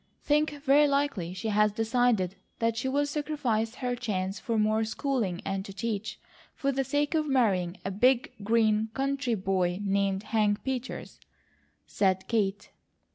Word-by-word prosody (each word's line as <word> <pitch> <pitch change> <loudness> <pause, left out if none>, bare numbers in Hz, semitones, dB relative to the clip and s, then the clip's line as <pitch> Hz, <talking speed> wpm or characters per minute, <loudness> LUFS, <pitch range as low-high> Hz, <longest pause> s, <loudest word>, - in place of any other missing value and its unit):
"Think 295 -1 +1
very 290 +1 +5
likely 275 -11 0
she 220 +5 -4
has 210 0 +3
decided 225 -3 +1 0.2
that 230 -1 0
she'll 265 +5 0
sacrifice 285 -7 -1
her 250 -1 -2
chance 195 -5 -3
for 230 -2 -2
more 215 +1 +2
schooling 220 -6 -2
and 195 -1 -2
to 195 - -8
teach, 220 0 -3 0.4
for 275 - 0
the 270 0 0
sake 290 +3 0
of 310 -1 +1
marrying 195 -10 +1
a 195 - -1
big, 245 +6 +3
green 220 0 +2
country 275 -3 0
boy 185 -2 0
named 195 0 0
Hank 210 -2 +1
Peters," 260 -1 -5 0.7
said 190 -2 0
Kate. 205 -3 -1
225 Hz, 145 wpm, -28 LUFS, 200-265 Hz, 0.7 s, very